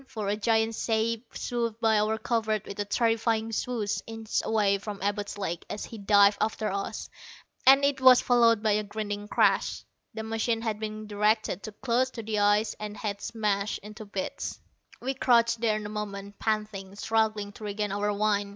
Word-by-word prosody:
For 215 Hz, -6 st, -4 dB
a 205 Hz, -, +1 dB
giant 220 Hz, +1 st, +1 dB
shape 225 Hz, +1 st, -1 dB
swooped 235 Hz, -2 st, -2 dB
by 220 Hz, -2 st, +3 dB
our 215 Hz, +1 st, +1 dB
covert 220 Hz, -2 st, -1 dB
with 200 Hz, -, -8 dB
a 205 Hz, -, 0 dB
terrifying 225 Hz, 0 st, +1 dB
swoosh, 225 Hz, -2 st, -1 dB
inches 225 Hz, -1 st, -2 dB
away 205 Hz, -3 st, +2 dB
from 205 Hz, 0 st, -6 dB
Abud's 205 Hz, 0 st, -2 dB
leg 175 Hz, -4 st, -3 dB
as 210 Hz, -, -4 dB
he 225 Hz, -, -9 dB
dived 200 Hz, 0 st, +5 dB
after 215 Hz, -1 st, 0 dB
us, 195 Hz, 0 st, -4 dB, 0.6 s
and 275 Hz, +1 st, +8 dB
it 280 Hz, -1 st, 0 dB
was 255 Hz, -1 st, +8 dB
followed 230 Hz, -3 st, +4 dB
by 215 Hz, -, +3 dB
a 210 Hz, +1 st, +2 dB
grinding 205 Hz, 0 st, -5 dB
crash. -, -, +2 dB, 0.3 s
The 220 Hz, -, -4 dB
machine 225 Hz, +1 st, -1 dB
had 215 Hz, -2 st, -2 dB
been 215 Hz, 0 st, -5 dB
directed 210 Hz, -2 st, +1 dB
too 215 Hz, -, -8 dB
close 250 Hz, +3 st, 0 dB
to 230 Hz, -, -6 dB
the 215 Hz, -1 st, -1 dB
ice 205 Hz, +2 st, +3 dB
and 210 Hz, 0 st, -6 dB
had 205 Hz, -1 st, -4 dB
smashed 210 Hz, -2 st, -1 dB
into 215 Hz, +1 st, -9 dB
bits. 200 Hz, -2 st, -4 dB, 0.4 s
We 265 Hz, +2 st, -1 dB
crouched 235 Hz, -3 st, +3 dB
there 220 Hz, -2 st, +2 dB
a 210 Hz, -1 st, -5 dB
moment, 205 Hz, -1 st, -6 dB
panting, 210 Hz, -3 st, -2 dB
struggling 215 Hz, -1 st, 0 dB
to 210 Hz, -, -13 dB
regain 210 Hz, 0 st, -2 dB
our 205 Hz, +1 st, 0 dB
wind. 205 Hz, -1 st, +1 dB
215 Hz, 180 wpm, -28 LUFS, 205-225 Hz, 0.6 s, and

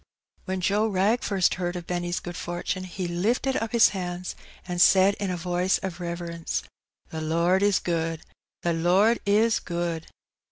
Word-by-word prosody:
When 190 Hz, -1 st, -3 dB
Joe 205 Hz, +4 st, +2 dB
Wrag 210 Hz, +4 st, +2 dB
first 195 Hz, -3 st, +2 dB
heard 175 Hz, 0 st, -2 dB
of 175 Hz, -1 st, -5 dB
Benny's 175 Hz, 0 st, -2 dB
good 175 Hz, 0 st, -7 dB
fortune 180 Hz, +1 st, -3 dB
he 185 Hz, 0 st, -4 dB
lifted 225 Hz, +10 st, 0 dB
up 225 Hz, 0 st, -3 dB
his 235 Hz, -1 st, +5 dB
hands^ 180 Hz, -2 st, -4 dB, 0.3 s
and 175 Hz, -1 st, -1 dB
said 190 Hz, +2 st, +6 dB
in 200 Hz, -, -2 dB
a 180 Hz, -, -2 dB
voice 180 Hz, +2 st, +1 dB
of 185 Hz, -2 st, -6 dB
reverence 170 Hz, -1 st, -4 dB
— -, -, -67 dB
" -, -, -39 dB
The 160 Hz, -, -4 dB
Lord 170 Hz, +4 st, +2 dB
is 205 Hz, -1 st, +4 dB
good! 165 Hz, -2 st, -2 dB, 0.4 s
the 170 Hz, -, +1 dB
Lord 185 Hz, +8 st, +3 dB
is 215 Hz, +3 st, +3 dB
good 170 Hz, -2 st, -3 dB
180 Hz, 175 wpm, -26 LUFS, 175-195 Hz, 0.4 s, said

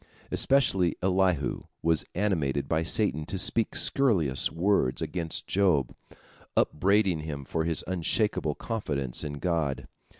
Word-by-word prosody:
Especially 95 Hz, -10 st, +2 dB
Elihu 90 Hz, -6 st, +1 dB, 0.2 s
was 80 Hz, -1 st, +2 dB
animated 80 Hz, -9 st, 0 dB
by 80 Hz, 0 st, +1 dB
Satan 80 Hz, -2 st, +1 dB
to 95 Hz, -, -3 dB
speak 110 Hz, +4 st, +1 dB
scurrilous 90 Hz, -, +2 dB
words 85 Hz, -7 st, +1 dB
against 80 Hz, +1 st, -3 dB
Job, 90 Hz, -10 st, +1 dB, 0.6 s
upbraiding 95 Hz, +1 st, +2 dB
him 75 Hz, -3 st, -6 dB
for 80 Hz, +4 st, -2 dB
his 80 Hz, -1 st, 0 dB
unshakable 90 Hz, -2 st, 0 dB
confidence 70 Hz, -, -3 dB
in 75 Hz, -, -4 dB
God. 75 Hz, -2 st, -2 dB
85 Hz, 120 wpm, -28 LUFS, 75-95 Hz, 0.6 s, Especially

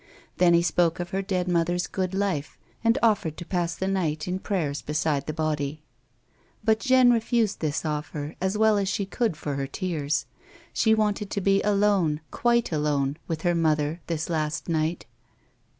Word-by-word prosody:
Then 175 Hz, -1 st, +5 dB
he 170 Hz, -, +4 dB
spoke 170 Hz, -1 st, +2 dB
of 175 Hz, 0 st, -4 dB
her 195 Hz, 0 st, 0 dB
dead 185 Hz, -2 st, -1 dB
mother's 175 Hz, 0 st, +1 dB
good 185 Hz, -1 st, -3 dB
life, 190 Hz, -7 st, -2 dB, 0.3 s
and 230 Hz, 0 st, +3 dB
offered 200 Hz, -9 st, +2 dB
to 175 Hz, -, -7 dB
pass 175 Hz, -2 st, -1 dB
the 190 Hz, -, -2 dB
night 170 Hz, -5 st, -1 dB
in 185 Hz, +1 st, -2 dB
prayers 160 Hz, -9 st, -2 dB
beside 150 Hz, -2 st, -1 dB
the -, -, -1 dB
body. 155 Hz, -1 st, -2 dB, 0.8 s
But 220 Hz, 0 st, +3 dB
Jeanne 255 Hz, -1 st, +5 dB
refused 230 Hz, -2 st, +1 dB
this 155 Hz, 0 st, -2 dB
offer 150 Hz, 0 st, -3 dB
as 190 Hz, +2 st, 0 dB
well 220 Hz, -1 st, +4 dB
as 195 Hz, -1 st, 0 dB
she 200 Hz, -, -1 dB
could 215 Hz, -3 st, -1 dB
for 145 Hz, -, -4 dB
her 135 Hz, 0 st, -2 dB
tears. 155 Hz, -2 st, -2 dB, 0.5 s
She 220 Hz, -1 st, +3 dB
wanted 210 Hz, -2 st, 0 dB
to 200 Hz, -, -2 dB
be 195 Hz, +1 st, +3 dB
alone, 200 Hz, -7 st, +2 dB
quite 235 Hz, -3 st, +1 dB
alone, 150 Hz, -2 st, 0 dB
with 160 Hz, -1 st, -3 dB
her 175 Hz, -1 st, +2 dB
mother 155 Hz, 0 st, +1 dB
this 160 Hz, -2 st, -2 dB
last 155 Hz, -2 st, -2 dB
night. 160 Hz, 0 st, -1 dB
175 Hz, 175 wpm, -26 LUFS, 155-200 Hz, 0.8 s, Then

